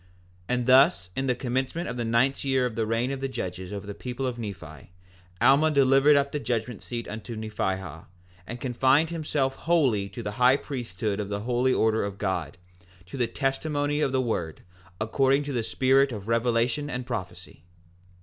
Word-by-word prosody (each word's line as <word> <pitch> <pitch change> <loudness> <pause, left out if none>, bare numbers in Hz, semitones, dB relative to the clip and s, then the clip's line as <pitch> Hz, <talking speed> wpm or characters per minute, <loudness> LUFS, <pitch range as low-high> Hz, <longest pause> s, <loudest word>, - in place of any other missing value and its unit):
4:20 125 - +2
And 125 -1 -1
thus 130 -8 +5
in 135 0 -1
the 125 - +2
commencement 130 +7 -2
of - - -4
the 120 - -2
ninth 115 +4 +1
year 135 -2 +1
of 125 - -2
the 115 -1 -1
reign 115 +4 0
of 135 - -4
the 135 - -2
judges 95 -7 -5
over 100 -1 -6
the 100 - -6
people 125 +4 -5
of 125 -2 -3
Nephi, 85 -8 -8 0.5
Alma 145 +4 +5
delivered 140 0 +5
up 140 0 +2
the 150 - -2
judgment 115 -2 -3
seat 120 -1 -5
to 110 +2 -7
Nephihah, 95 -6 -4 0.4
and 120 +2 -6
confined 135 +5 +2
himself 145 -5 -1
wholly 130 -12 +1
to 120 +4 -7
the 105 - -3
high 130 +2 +6
priesthood 110 -7 -4
of 100 -1 -3
the 100 0 -3
holy 125 +3 +1
order 110 -2 +2
of 100 -1 -4
God, 95 -6 -3 0.5
to 95 - -10
the 125 -3 0
testimony 145 +4 -1
of 135 - +1
the 130 -1 +1
word, 90 -10 -3 0.4
according 135 +6 +2
to 145 -1 -5
the 120 - 0
spirit 135 +4 +2
of 105 -3 -7
revelation 115 +4 +1
and 125 -3 -4
prophecy. 95 - -7
125 Hz, 190 wpm, -26 LUFS, 110-135 Hz, 0.5 s, high